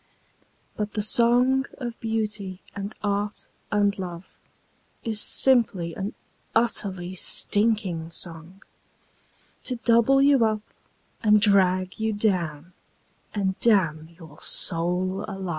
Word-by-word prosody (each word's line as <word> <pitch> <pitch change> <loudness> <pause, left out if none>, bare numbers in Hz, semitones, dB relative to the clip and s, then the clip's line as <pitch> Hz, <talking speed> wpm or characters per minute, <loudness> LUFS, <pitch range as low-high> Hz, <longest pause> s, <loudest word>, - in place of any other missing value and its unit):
But 210 -1 -4
the 210 - -2
song 245 +4 +3
of 240 -4 -6
Beauty 210 -4 -3 0.2
and 200 +1 -6
Art 205 0 -2 0.2
and 205 -1 +2
Love 175 -1 -8 0.7
Is 220 -2 0
simply 215 -10 +3
an 195 +4 -5 0.4
utterly 195 -6 -1
stinking 200 -3 +1
song, 170 +2 -5 1.0
To 255 - 0
double 235 +2 +3
you 275 -3 +4
up 215 -1 0 0.6
and 210 -1 +4
drag 185 -2 +2
you 220 0 -1
down 180 -6 -2 0.6
And 190 -2 -2
damn 165 -8 +2
your 160 -4 -15
soul 180 +3 +1
alive. 195 -3 -6
205 Hz, 110 wpm, -24 LUFS, 185-225 Hz, 1.0 s, you